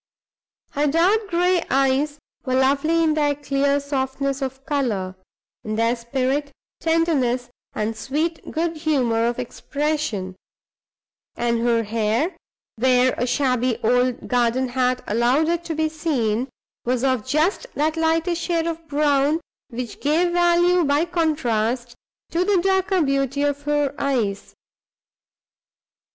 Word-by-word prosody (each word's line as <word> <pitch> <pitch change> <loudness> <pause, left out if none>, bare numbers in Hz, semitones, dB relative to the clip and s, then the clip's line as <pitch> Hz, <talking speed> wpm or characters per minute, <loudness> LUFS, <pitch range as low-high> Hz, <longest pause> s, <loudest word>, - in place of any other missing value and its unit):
Her 295 +1 0
dark 370 +8 +2
gray 355 0 +2
eyes 275 +2 +1 0.3
were 255 -1 -1
lovely 280 +5 +2
in 315 -1 +3
their 295 -2 +1
clear 280 0 +1
softness 275 0 -2
of 265 0 -5
color, 225 -11 -1 0.5
in 215 0 -3
their 230 +2 +2
spirit, 265 +4 -2 0.3
tenderness, 275 -7 +1 0.2
and 215 +1 -2
sweet 310 +8 -3
good 330 0 -2
humor 250 -8 +1
of 240 - -2
expression; 250 -6 -3 1.0
and 235 -1 0
her 235 -1 +2
hair 225 - 0 0.4
(where 255 +1 +3
a 245 - -1
shabby 250 -2 +1
old 245 +2 +1
garden 245 +1 +1
hat 250 0 0
allowed 240 +8 +2
it 340 0 0
to 325 - -3
be 315 0 +1
seen) 270 -7 -1 0.3
was 250 0 -1
of 260 -4 +1
just 310 - 0
that 310 +2 0
lighter 325 +2 +1
shade 335 -1 -1
of 330 -1 -4
brown 290 +1 +2 0.3
which 240 -3 -6
gave 330 +5 +2
value 350 0 +4
by 290 +2 +2
contrast 250 -9 -1 0.4
to 340 +2 +1
the 395 -1 +2
darker 380 -1 +2
beauty 275 0 0
of 285 0 0
her 295 -2 +1
eyes. 235 -8 -1
280 Hz, 130 wpm, -22 LUFS, 245-320 Hz, 1.0 s, value